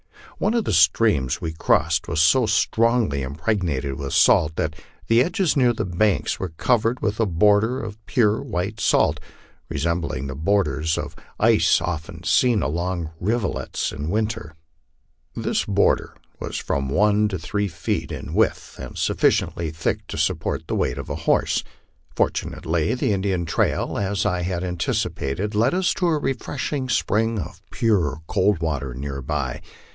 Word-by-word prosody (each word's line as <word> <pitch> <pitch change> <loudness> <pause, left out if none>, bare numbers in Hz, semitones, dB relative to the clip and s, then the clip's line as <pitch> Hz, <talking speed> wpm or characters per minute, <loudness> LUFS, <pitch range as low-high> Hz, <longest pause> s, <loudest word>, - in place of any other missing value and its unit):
One 220 - +1
of 230 - +1
the - - 0
streams 80 - +3
we 80 -2 -4
crossed 80 0 +1
was 75 - -1
so 95 - +4
strongly 110 - +2
impregnated 70 -2 -2
with 70 -1 -4
salt 80 +1 +4
that 80 -1 -2 0.3
the 115 +1 +4
edges 185 0 0
near 125 -4 +4
the 110 -3 -2
banks 95 +3 0
were 95 - -3
covered 115 +8 +1
with 105 0 -2
a 115 - +2
border 105 +7 +3
of 110 -3 -7
pure 110 -5 +2
white 95 +5 -3
salt, - - +2 0.5
re - - -4
sembling 85 -5 -1
the 70 - -4
borders 80 -1 0
of - - -5 0.2
ice - - +4
often 85 0 -5
seen 120 +3 +3
along 85 +2 -2
rivulets 110 +2 -1
in 75 +3 -5
winter. 110 -5 -2 0.8
This - - -1
border - - +1 0.2
was - - -4
from 70 -1 -2
one 105 +7 +3
to 95 -3 -3
three 100 +5 -2
feet 85 - -3
in - - -6
width, - - 0
and - - -8
sufficiently 85 -2 +1
thick 80 0 -3
to - - -6
support - - -1
the - - -3
weight - - 0
of - - -6
a - - -2
horse. - - +2 0.5
Fortunately 80 +5 0
the 115 - 0
Indian 95 -3 -1
trail, 80 - 0
as 100 0 -1
I 90 0 0
had 90 0 -2
anticipated, 90 +1 -2
led 110 +10 +2
us 185 -1 +2
to 180 - 0
a 160 -2 +2
refreshing 135 0 -3
spring 115 0 +1
of 95 - -6
pure, 85 - +1
cold 95 0 +1
water 70 -6 -2
near 70 +1 -5
by. 70 -3 -3
95 Hz, 160 wpm, -23 LUFS, 80-110 Hz, 0.8 s, so